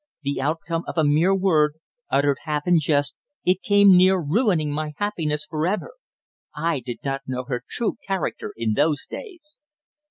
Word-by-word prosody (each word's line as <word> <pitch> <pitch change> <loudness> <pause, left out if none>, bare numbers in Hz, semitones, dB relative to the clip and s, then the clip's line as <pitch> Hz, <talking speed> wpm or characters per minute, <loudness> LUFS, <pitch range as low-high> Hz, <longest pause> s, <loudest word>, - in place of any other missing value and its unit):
The 140 -1 -2
outcome 165 +3 -2
of - - -6
a 160 - +4
mere 155 +6 +3
word, 155 -6 +2 0.3
uttered 140 0 +2
half 150 -1 -2
in 175 -2 +4
jest, 145 -2 +1 0.3
it 185 +1 +2
came 200 -2 +6
near 185 +1 +5
ruining 165 - +1
my 150 +1 -3
happiness 160 -8 -2
for 155 0 -1
ever. 210 - -2 0.6
I 165 -3 0
did 120 -1 -7
not 135 0 -2
know 130 -1 -3
her 125 -1 -4
true 235 -2 -2
character 195 -4 -2
in 115 -2 0
those 145 +3 +1
days." 335 -9 -10
155 Hz, 165 wpm, -23 LUFS, 145-190 Hz, 0.6 s, came